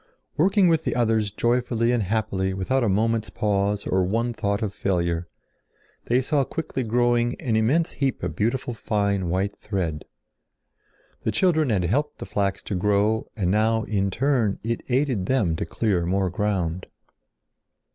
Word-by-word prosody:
Working 190 +4 +4
with 165 -2 +2
the - - -1
others 110 -3 +2
joyfully 120 +1 +1
and 120 -2 +1
happily 95 -2 -1
without 125 +8 0
a 115 - +2
moment's 110 +3 +1
pause 100 0 0
or 95 0 +1
one 115 +6 0
thought 100 -1 -1
of 100 -2 -2
failure, 85 -4 -1 0.8
they 125 +2 +2
saw 140 +1 +1
quickly 140 -1 -4
growing 120 +1 +1
an 115 -3 -1
immense 135 +10 +2
heap 135 -7 -2
of 90 -3 -3
beautiful 120 +5 -1
fine 100 -4 -1
white 95 +3 -1
thread. 85 -7 -3 1.2
The - - -1
children 160 -6 +2
had 100 -5 +1
helped 145 - 0
the - - -7
flax 100 -1 -1
to - - -5
grow 105 +3 +1
and 90 -5 0
now 110 +2 +2
in 100 -3 0
turn 120 -1 +1
it 115 +1 -2
aided 125 -7 +1
them 110 -11 +1
to - - -3
clear 95 -7 0
more 95 0 +1
ground. 90 -3 -1
110 Hz, 155 wpm, -24 LUFS, 95-120 Hz, 1.2 s, Working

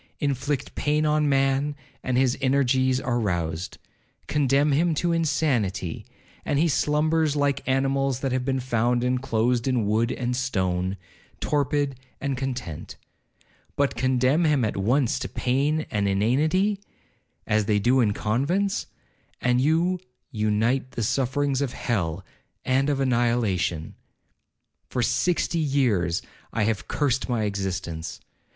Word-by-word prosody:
Inflict 140 -1 -2
pain 150 +1 +1
on 150 -1 +2
man, 135 +1 +1 0.3
and 125 -1 -1
his 130 -1 +3
energies 130 -1 +2
are 120 -2 -1
roused—condemn 110 - -1
him 160 +3 +2
to 170 +3 0
insanity, 140 - 0 0.4
and 145 - 0
he 165 +4 +3
slumbers 155 0 +1
like 140 -1 +1
animals 135 0 +1
that 135 - -1
have 130 0 0
been 135 0 0
found 120 -1 +1
inclosed 125 -1 0
in 125 -5 +1
wood 110 +3 +1
and 125 0 -2
stone, 95 -7 -1 0.4
torpid 145 -2 0 0.2
and 140 -1 -2
content; 125 - -5 0.8
but 140 -1 +1
condemn 130 +5 +2
him 150 -7 +3
at 110 - -2
once 120 +6 +1
to 125 - -4
pain 145 +5 0
and 100 -1 0
inanity, 155 - +2 0.7
as 110 -1 +1
they 105 0 +2
do 125 +6 +3
in 110 -4 +3
convents, 140 - 0 0.5
and 125 0 +2
you 165 +6 +2 0.3
unite 115 +3 0
the 115 - -2
sufferings 135 +3 0
of 135 -3 -2
hell 90 -10 -2 0.4
and 135 +2 +2
of 140 -2 0
annihilation. 115 - 0 1.0
For 125 - -1
sixty 170 +6 +1
years 120 - +1 0.3
I 110 - 0
have 110 -1 -1
cursed 135 -3 0
my 120 -3 0
existence. 95 -5 -3
130 Hz, 130 wpm, -25 LUFS, 110-145 Hz, 1.0 s, his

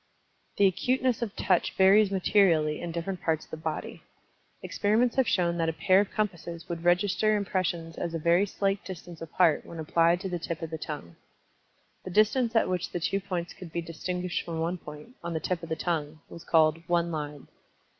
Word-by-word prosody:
The 200 - +5
acuteness 250 +6 +1
of 220 -4 -3
Touch 180 -3 +1
varies 195 +2 +5
materially 180 -6 +2
in 175 - -4
different 170 +2 -4
parts 160 -2 0
of - - -29
the - - -5
body. 160 -1 -5 0.6
Experiments 225 +4 +1
have 265 -2 +3
shown 170 -2 +1
that 165 0 +1
a - - -2
pair 185 +4 +4
of 205 - +1
compasses 170 -5 -3
would 170 -1 -5
register 195 +4 +3
impressions 175 -4 -2
as 165 -1 -3
a - - +1
very 170 +5 +3
slight 195 0 -1
distance 175 -3 -9
apart 165 0 +2
when 170 - -10
applied 165 +2 +2
to 195 - -3
the 180 -2 -3
tip 165 0 -5
of 165 - -5
the 160 - -3
tongue. 145 - -7 0.9
The - - -6
distance 220 +5 +2
at 225 - +4
which 180 -1 -2
the 175 - -2
two 195 +4 0
points 180 -3 -4
could 180 -3 -11
be 170 +1 -3
distinguished 180 +2 -3
from 165 -1 -5
one 170 +2 -1
point, 150 +5 -10
on 170 0 -3
the 160 - -1
tip 175 +2 -2
of 165 - -8
the 160 - -1
tongue, 155 -2 -2
was 170 - -10
called 160 0 +3
"one 170 -1 +1
line." 150 -3 -5
175 Hz, 200 wpm, -28 LUFS, 165-195 Hz, 0.9 s, The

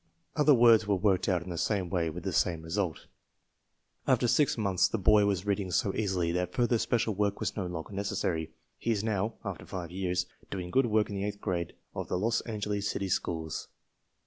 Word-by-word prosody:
Other 150 -2 +5
words 115 -3 +6
were 100 - +3
worked 95 0 +2
out 90 -3 +1
in 90 - -7
the 85 - -3
same 100 -1 0
way 85 -2 0
with 85 +2 -7
the 95 -2 -2
same 85 -2 +1
result. 85 -1 -2 1.0
After 120 - +3
six 145 +2 +3
months 95 -4 +2
the - - -2
boy 105 +1 +5
was 100 -2 0
reading 100 -2 0
so 95 +2 +1
easily 95 -5 0
that 90 +1 -2
further 120 -1 +2
special 115 -2 +1
work 100 0 0
was - - -2
no 95 -4 -2
longer 90 +2 -6
necessary. 95 -5 -2 0.3
He - - -3
is 105 -3 +1
now 110 0 -1
(after 100 -4 -5
five 85 -3 -5
years) 90 -1 -1 0.2
doing 90 -2 -5
good 130 +2 +3
work 110 -1 +2
in - - -4
the 100 - -2
eighth 105 0 -4
grade 90 -5 -2 0.2
of - - -4
the - - -1
Los 115 +5 +1
Angeles 105 -2 -2
city 100 -1 -2
schools. 80 -3 -2
100 Hz, 205 wpm, -30 LUFS, 90-105 Hz, 1.0 s, words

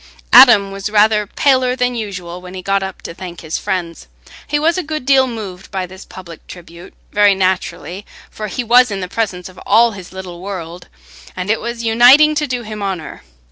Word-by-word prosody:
Adam 200 -1 +8
was 195 +1 -5
rather 210 0 +3
paler 255 +1 +1
than 250 -1 0
usual 185 -6 -6
when 180 +1 -11
he 185 - -7
got 195 +1 0
up 190 -1 -7
to - - -7
thank 175 -1 -9
his 160 -1 -4
friends. 180 -4 -4 0.4
He 295 - 0
was 320 +3 +1
a 370 - -1
good 310 -5 -5
deal 265 -1 +4
moved 200 -6 -8
by 190 -1 -3
this 185 +2 -13
public 175 -3 -12
tribute—very 180 +4 -2
naturally, 190 0 -2 0.2
for 215 - -6
he 245 +5 -4
was 245 +2 +5
in 200 -2 -4
the 180 - -4
presence 190 -3 -3
of 185 -1 -14
all 230 +3 +4
his 190 -4 -11
little 185 -2 -9
world, 180 -3 -7 0.5
and 185 +3 -2
it 220 - -1
was 235 0 -5
uniting 245 +7 +6
to 300 0 -1
do 250 -2 -4
him 215 -1 -7
honour. 190 -5 -5
200 Hz, 195 wpm, -16 LUFS, 185-235 Hz, 0.5 s, Adam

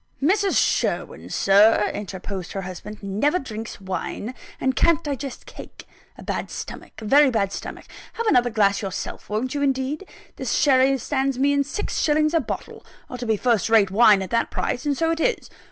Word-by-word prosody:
"Mrs. 390 +7 +2
Sherwin, - - 0
Sir," 210 +2 +4
interposed 190 -2 -6
her 195 - -4
husband, 195 +4 -8
"never 215 - +1
drinks 225 -8 -7
wine, 195 +4 -4 0.3
and 260 0 0
can't 335 -1 +3
digest 280 -2 -5
cake. - - -11 0.3
A - - -11
bad - - -3
stomach - - -8
a - - -6
very 280 +5 +6
bad 205 -5 0
stomach. - - -7 0.3
Have 465 - -3
another 245 - +4
glass 205 -3 +2
yourself. 195 -3 -6
Won't 220 +5 -2
you, 290 - -2
indeed? 275 +5 -1 0.3
This - - -2
sherry 270 -2 +4
stands 270 +1 -1
me 280 +2 +2
in 280 0 +2
six 285 +9 -3
shillings 305 +1 +2
a 330 - +4
bottle 255 - -6 0.3
ought 250 - -6
to 240 - -4
be 220 -1 +2
first 230 -3 +1
rate 215 -4 +4
wine 210 -2 +5
at 185 - -8
that 230 - +1
price: 260 +5 -2
and 285 -2 0
so 325 0 +1
it 330 - -2
is. - - -1
250 Hz, 185 wpm, -23 LUFS, 210-285 Hz, 0.3 s, very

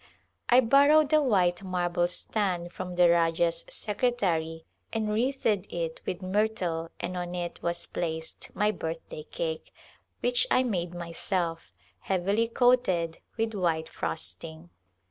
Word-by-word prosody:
I 245 +2 +7
borrowed 285 +5 +5
a 310 - +6
white 185 -10 +2
marble 175 -2 0
stand 180 -2 -2
from 180 -1 -5
the 175 0 +6
Rajah's 170 0 +2
secretary 185 -8 -1 0.3
and 220 -1 -1
wreathed 225 -4 0
it 165 -2 -3
with 185 +1 -3
myrtle 185 -4 0
and 180 +1 -3
on 175 0 -4
it 175 -1 -4
was 170 0 -1
placed 160 -1 -4
my 210 +1 +2
birthday 165 -4 -5
cake 160 -1 -4 0.3
— - - -44
which - - +3
I 255 - +4
made 180 -7 -2
myself 170 - -3
— 90 +1 -35
heavily 195 - +1
coated 230 -9 +2 0.2
with 225 0 0
white 165 -5 0
frosting. 80 +2 -5
180 Hz, 135 wpm, -28 LUFS, 170-220 Hz, 0.3 s, I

